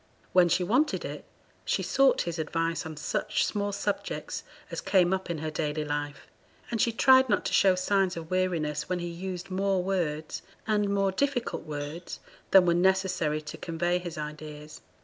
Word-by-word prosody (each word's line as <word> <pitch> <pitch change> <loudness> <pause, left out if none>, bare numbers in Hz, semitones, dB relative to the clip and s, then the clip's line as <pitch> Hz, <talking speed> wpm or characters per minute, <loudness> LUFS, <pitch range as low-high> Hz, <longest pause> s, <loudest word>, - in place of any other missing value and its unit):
When 180 -1 +6
she 180 - +2
wanted 260 - +1
it, - - -6 0.4
she - - 0
sought 270 -1 +3
his 170 -1 -4
advice 165 +1 -1
on 155 -1 -8
such 210 +7 0
small 205 -1 -1
subjects 205 - -3 0.3
as - - -3
came 185 -2 +3
up 190 -1 -2
in 170 - -2
her 155 +1 -4
daily 150 0 -2
life; 145 0 -4 0.5
and 230 - 0
she 235 - +3
tried 260 +2 +5
not 205 - +1
to - - -2
show 190 -2 +5
signs 185 -1 +1
of 165 0 -7
weariness 170 -5 0
when 180 - 0
he 175 - -4
used 180 +2 -6
more 190 -1 +1
words 160 -5 -2 0.2
and 210 -2 +1
more 195 -1 +2
difficult 250 - -1
words 150 +3 -6 0.3
than 190 -2 +7
were 170 - +4
necessary 180 -4 +1
to 150 - -7
convey 175 +1 -1
his 175 -2 -7
ideas. 150 0 -7
180 Hz, 175 wpm, -28 LUFS, 155-195 Hz, 0.5 s, than